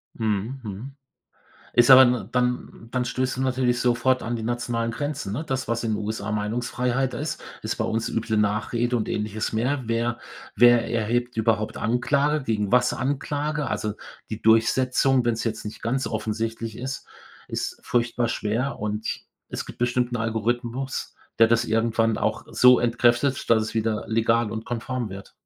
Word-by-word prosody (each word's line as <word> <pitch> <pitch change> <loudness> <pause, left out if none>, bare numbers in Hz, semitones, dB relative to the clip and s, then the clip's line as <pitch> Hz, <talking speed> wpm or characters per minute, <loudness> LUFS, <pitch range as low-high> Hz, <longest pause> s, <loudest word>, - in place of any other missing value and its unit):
Mhm, 110 +4 -2
mhm. 110 +5 -7 0.8
Ist 120 0 +5
aber, 130 0 +11
ne 120 -5 0
dann 125 -2 -1
dann 125 0 0
stößt 130 +1 -1
du 130 - -1
natürlich 130 -2 +1
sofort 125 +1 +2
an 120 +1 -2
die 115 - -3
nationalen 120 0 -1
Grenzen, 140 -4 -4
ne? 155 +9 -3
Das, 130 -2 -2
was 115 0 -1
in 110 -1 0
USA 105 0 -3
Meinungsfreiheit 125 +4 -1
ist, 150 +2 -4 0.2
ist - - -2
bei - - -1
uns 115 +1 -1
üble 115 -1 -1
Nachrede 115 +4 +1
und 110 - -2
Ähnliches 105 0 -2
mehr. 125 +5 0
Wer 115 +1 0 0.4
wer 120 -1 +6
erhebt 120 +2 0
überhaupt 110 -1 0
Anklage 140 +5 +1
gegen 105 -3 -1
was 125 0 +4
Anklage? 145 +2 -2
Also, 105 -1 -2 0.4
die 110 - -5
Durchsetzung, 125 +3 +3
wenn's 115 -1 0
jetzt 110 -1 -3
nicht 105 - -7
ganz 130 +4 -1
offensichtlich 110 0 -3
ist, 130 +2 -5 0.4
ist - - -4
furchtbar 120 0 0
schwer 115 +5 -2
und 105 +1 -3 0.4
es - - -4
gibt - - -11
bestimmt 120 0 0
'n - - 0
Algorithmus, 120 +3 -2 0.2
der 115 - +7
das 115 0 +2
irgendwann 115 0 +1
auch - - -1
so 125 0 +6
entkräftet, 120 +3 +2
dass 110 -1 +4
es 110 - -5
wieder 110 -1 0
legal 115 0 +2
und 110 0 -5
konform 120 0 -3
wird. 95 +1 -10
120 Hz, 165 wpm, -24 LUFS, 110-125 Hz, 0.8 s, aber